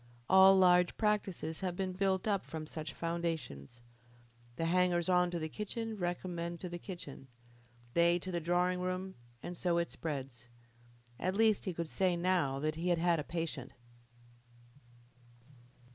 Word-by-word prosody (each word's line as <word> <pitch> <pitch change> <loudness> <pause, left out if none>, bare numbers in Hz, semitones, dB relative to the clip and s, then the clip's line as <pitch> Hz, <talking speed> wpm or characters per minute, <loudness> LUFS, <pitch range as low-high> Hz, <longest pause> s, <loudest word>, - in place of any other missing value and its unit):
All 190 +1 +8
large 180 -1 +5
practices 195 -7 -1
have 185 -2 -2
been 185 0 -2
built 190 +1 0
up 200 -3 +1
from 160 -1 -6
such 155 -1 -6
foundations. 160 - -4 0.7
The 165 - -2
hangers 180 0 +2
on 180 -1 +4
to 175 - -3
the 160 -1 -3
kitchen 220 +5 -4
recommend 175 -2 -3
to 180 - -4
the 175 0 -6
kitchen, 165 -8 -8 0.7
they 170 +1 +4
to 185 +1 -5
the 175 - -1
drawing 180 +2 +1
room, 185 +1 -3 0.3
and 175 +1 -5
so 175 0 +1
it 170 0 0
spreads. 130 -6 -5 0.7
At 185 +1 -1
least 220 -2 +3
he 185 - -2
could 170 0 -3
say 180 +2 +1
now 170 -6 +1
that 155 +2 -1
he 175 +2 -1
had 175 - +3
had 170 0 +2
a - - -2
patient. 160 -6 -4
175 Hz, 155 wpm, -33 LUFS, 165-185 Hz, 0.7 s, All